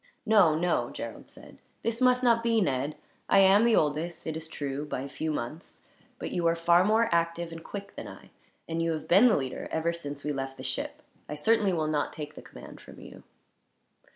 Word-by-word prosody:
"No, 205 -8 +5
no," 175 +2 0
Gerald - - -8
said. - - -15 0.2
"This 230 +1 -2
must 250 0 +4
not 230 -2 +4
be, 230 -1 +2
Ned. 140 -4 -1 0.3
I - - +5
am 195 +2 +6
the 235 -2 +4
oldest, 160 +3 -1
it 160 - -3
is 160 0 -6
true, 145 -2 -4
by 145 -3 -4
a 140 - -5
few 155 +3 -4
months; 150 +3 -6 0.3
but - - -5
you 170 -1 0
are 165 - +3
far 170 +1 +4
more 220 +3 +3
active 170 0 0
and 165 0 -9
quick 200 -1 -8
than - - -7
I, - - -13 0.4
and 165 0 -2
you 165 0 +1
have 155 - -6
been 195 +8 +6
the 230 - +4
leader, 130 -2 -4
ever 165 +1 -1
since 145 -4 -6
we 150 - -2
left 135 -1 -5
the - - -9
ship. - - -4 0.3
I 150 - -4
certainly 210 +5 +2
will 160 -3 0
not 155 -1 -1
take 150 -1 -7
the - - -11
command - - -12
from - - -14
you." - - -12
165 Hz, 215 wpm, -28 LUFS, 150-200 Hz, 0.4 s, am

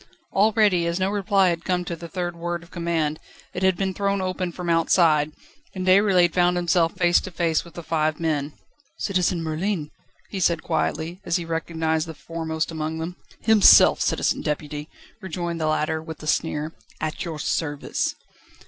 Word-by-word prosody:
Already, 205 -4 +3
as 170 +2 -1
no 190 +1 +1
reply 195 -2 +2
had 170 -1 -2
come 180 -1 -1
to 170 - -4
the 170 +1 -9
third 175 0 -4
word 170 0 -4
of 170 - -18
command, 165 -3 -1 0.3
it 180 - -4
had 190 -1 +3
been 190 0 -1
thrown 200 +1 0
open 185 -1 -2
from 175 +1 -7
outside, 165 -2 +3 0.4
and 185 -1 -3
Déroulède 185 -2 +4
found 180 0 +3
himself 170 -1 +2
face 175 0 +4
to - - -7
face 165 -2 0
with 170 - -15
the 170 - -7
five 155 -1 0
men. 150 -3 -1 0.4
"Citizen 180 -3 0
Merlin!" 160 0 -2 0.4
he 195 - -3
said 170 -2 +1
quietly, 165 +5 -2
as 170 - -1
he 175 - -1
recognised 160 -1 -1
the 160 - -7
foremost 160 +1 -4
among 160 0 -3
them. 165 +2 -5 0.3
"Himself, 220 -2 +7
Citizen - - +1
Deputy," 150 0 -4 0.3
rejoined 170 -2 -4
the 155 - +1
latter, 155 +1 0
with 160 -1 -9
a - - -7
sneer, 155 0 -1 0.3
"at 155 +4 -3
your 165 -4 -5
service." 145 0 -2
170 Hz, 175 wpm, -24 LUFS, 160-185 Hz, 0.4 s, Himself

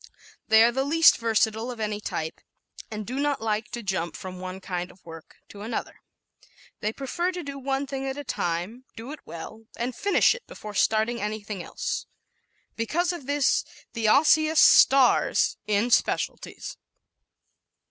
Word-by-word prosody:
They 220 0 +7
are 235 - +5
the 265 +2 0
least 325 +4 +5
versatile 225 0 +1
of 245 -2 -7
any 210 -1 -2
type 160 -5 -4 0.5
and 215 -1 -5
do 255 +5 -4
not 290 -1 0
like 220 -1 -2
to 240 - -6
jump 185 -4 -2
from 185 -1 -8
one 185 +1 -6
kind 180 -1 -4
of 180 - -20
work 165 -1 -12
to 200 - -11
another. 225 +2 -5 0.8
They 215 - -1
prefer 280 +9 -2
to 355 -1 -5
do 280 -1 -6
one 270 +1 -1
thing 270 0 -4
at 265 +1 -4
a 290 - -5
time, 185 +3 -3
do 230 +5 -8
it 305 - -8
well 215 +7 -9
and 240 +1 -3
finish 405 -1 +3
it 485 - -11
before 210 -1 -9
starting 220 +3 +1
anything 210 -2 -4
else. - - -4 0.7
Because 335 +11 0
of 290 -7 -8
this 285 -1 +2 0.3
the 225 -2 -1
Osseous 310 +5 +4
stars 270 -2 +5
in 210 +3 +1
specialities. - - -1
230 Hz, 160 wpm, -26 LUFS, 210-275 Hz, 0.8 s, They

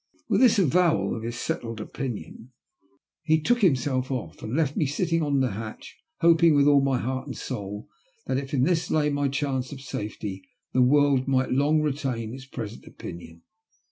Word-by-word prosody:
With - - +2
this 245 -5 +6
avowal 175 -1 +2
of 110 - -5
his 120 +1 -5
settled 115 -2 -3
opinion 120 +1 -6 0.7
he 160 0 +2
took 240 +8 +1
him 170 -8 +6
self 130 0 -2
off, 120 - -5
and 110 +4 -4
left 150 -3 +1
me 150 - +1
sitting 165 +3 0
on 145 -3 +1
the 130 - +1
hatch, 110 +2 -7 0.3
hoping 165 -1 +5
with 140 -1 +5
all 145 -1 +6
my 135 -2 +1
heart 130 +2 -3
and - - -6
soul 105 -3 -5 0.4
that, 130 - 0
if 135 0 -7
in 135 -4 +2
this 170 +2 +1
lay 150 -1 +2
my 145 0 +1
chance 135 -2 -2
of 140 - -7
safety, 105 -6 -5 0.3
the 130 - +3
world 140 0 +4
might 130 -1 +1
long 150 +4 +3
retain 135 -6 -2
its 135 0 -9
present 115 -4 -7
opinion. 85 -1 -10
135 Hz, 185 wpm, -26 LUFS, 120-150 Hz, 0.7 s, this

